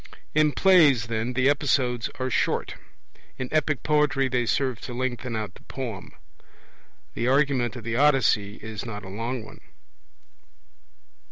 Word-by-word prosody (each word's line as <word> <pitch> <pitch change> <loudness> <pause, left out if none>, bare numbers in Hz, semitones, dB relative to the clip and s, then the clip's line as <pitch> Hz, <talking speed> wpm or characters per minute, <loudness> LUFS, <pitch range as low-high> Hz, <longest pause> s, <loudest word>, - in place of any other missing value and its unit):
In 155 -1 +4
plays, 155 - +5
then, 115 +2 -2
the 130 +1 +2
episodes 130 -4 +1
are 130 0 -2
short; - - 0 0.6
in 130 -1 -4
epic 155 -2 0
poetry 150 -3 +2
they 125 -2 0
serve 130 -1 0
to 120 - -7
lengthen 125 -1 -3
out 110 -1 -4
the - - -17
poem. 120 -8 -7 1.0
The 120 - -2
argument 135 -2 +2
of 120 - -8
the 115 +1 -2
Odyssey 125 -8 +3
is 110 -1 -6
not 105 -4 -7
a - - -8
long 115 +4 -4
one. - - -13
125 Hz, 145 wpm, -25 LUFS, 115-140 Hz, 1.0 s, plays